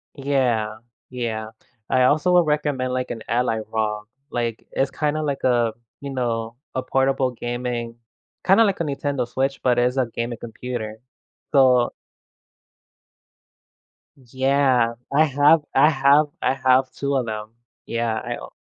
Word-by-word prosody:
Yeah. 125 Hz, -6 st, 0 dB, 0.3 s
Yeah. 115 Hz, -3 st, -4 dB, 0.4 s
I 130 Hz, 0 st, +3 dB
also 155 Hz, +7 st, +3 dB
would 175 Hz, -2 st, +5 dB
recommend 145 Hz, -4 st, 0 dB
like, 130 Hz, 0 st, -2 dB
an 115 Hz, -, -5 dB
Ally 115 Hz, -2 st, +1 dB
ROG, 105 Hz, -1 st, -2 dB, 0.2 s
like, 115 Hz, -2 st, -3 dB
it's 135 Hz, -, 0 dB
kinda 155 Hz, 0 st, -1 dB
like 140 Hz, -2 st, -2 dB
a, 120 Hz, -3 st, +2 dB, 0.3 s
you 140 Hz, -1 st, -6 dB
know, 115 Hz, -3 st, -2 dB, 0.2 s
a 130 Hz, -, -1 dB
portable 135 Hz, 0 st, +1 dB
gaming, 120 Hz, -1 st, -4 dB, 0.5 s
kinda 195 Hz, +5 st, +6 dB
like 200 Hz, -4 st, 0 dB
a 170 Hz, -, +1 dB
Nintendo 140 Hz, -3 st, -2 dB
Switch, 135 Hz, +2 st, -2 dB
but 125 Hz, -1 st, +2 dB
it's 125 Hz, +2 st, +2 dB
a 130 Hz, -2 st, +2 dB
gaming 115 Hz, 0 st, -4 dB
computer. 115 Hz, -1 st, -6 dB, 0.5 s
So 130 Hz, -4 st, +4 dB, 2.2 s
Yeah, 130 Hz, -2 st, +1 dB, 0.2 s
I 155 Hz, +3 st, +5 dB
have 145 Hz, +2 st, +4 dB
I 135 Hz, +3 st, +6 dB
have 140 Hz, +2 st, +4 dB, 0.2 s
I 130 Hz, -, +2 dB
have 130 Hz, 0 st, +3 dB
2 140 Hz, 0 st, -2 dB
of 125 Hz, -3 st, 0 dB
them. 110 Hz, 0 st, -5 dB, 0.4 s
Yeah, 115 Hz, -1 st, -1 dB
I 110 Hz, -, -4 dB
own -, -, -10 dB
130 Hz, 140 wpm, -22 LUFS, 115-140 Hz, 2.2 s, kinda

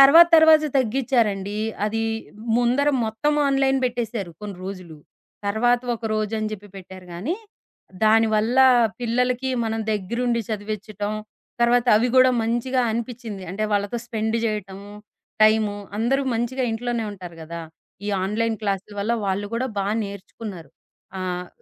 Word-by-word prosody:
తర్వాత, 310 Hz, +5 st, +9 dB
తర్వాత 315 Hz, -1 st, +7 dB
తగ్గిచ్చారండి. 220 Hz, -5 st, 0 dB, 0.3 s
అది 225 Hz, +1 st, -1 dB, 0.5 s
ముందర 245 Hz, +4 st, +2 dB, 0.2 s
మొత్తం 220 Hz, +8 st, 0 dB
ఆన్‌లైన్ 270 Hz, -1 st, +2 dB
బెట్టేశారు 230 Hz, -7 st, -3 dB
కొన్ని 205 Hz, -2 st, -6 dB
రోజులు. 185 Hz, -5 st, -8 dB, 0.5 s
తర్వాత 240 Hz, +4 st, +2 dB
ఒక 230 Hz, -, -11 dB
రోజని 215 Hz, 0 st, -1 dB
జెప్పి 205 Hz, 0 st, -8 dB
పెట్టారు 185 Hz, -1 st, -11 dB
గానీ, 240 Hz, -, -2 dB, 0.7 s
దానివల్ల 220 Hz, +2 st, +3 dB, 0.4 s
పిల్లలకి 250 Hz, +2 st, 0 dB
మనం 225 Hz, 0 st, -2 dB
దెగ్గరుండి 235 Hz, +4 st, -1 dB
చదివిచ్చటం, 210 Hz, -1 st, -4 dB, 0.5 s
తర్వాత 240 Hz, +1 st, +3 dB
అవి 235 Hz, +4 st, +2 dB
గూడా 255 Hz, 0 st, +7 dB
మంచిగా 240 Hz, +3 st, 0 dB
అనిపిచ్చింది. 225 Hz, -3 st, -5 dB
అంటే 215 Hz, +3 st, -3 dB
వాళ్ళతో 205 Hz, +2 st, 0 dB
స్పెండు 220 Hz, -1 st, -1 dB
జేయటము 200 Hz, -2 st, -4 dB, 0.5 s
టైము. 215 Hz, -1 st, +4 dB, 0.2 s
అందరూ 265 Hz, +5 st, +1 dB
మంచిగా 240 Hz, +3 st, -1 dB
ఇంట్లోనే 235 Hz, 0 st, -2 dB
ఉంటారు 180 Hz, -4 st, -10 dB
గదా. 170 Hz, +1 st, -7 dB, 0.5 s
ఈ -, -, -2 dB, 0.2 s
ఆన్‌లైన్ 225 Hz, +3 st, 0 dB
క్లాసుల 200 Hz, 0 st, -2 dB
వల్ల 220 Hz, +4 st, 0 dB
వాళ్ళు 195 Hz, +1 st, -1 dB
గూడా 245 Hz, +3 st, 0 dB
బా 195 Hz, -, 0 dB, 0.2 s
నేర్చుకున్నారు. 200 Hz, -4 st, -8 dB, 0.5 s
ఆహ్, 180 Hz, -1 st, -3 dB
220 Hz, 125 wpm, -23 LUFS, 200-245 Hz, 0.7 s, తర్వాత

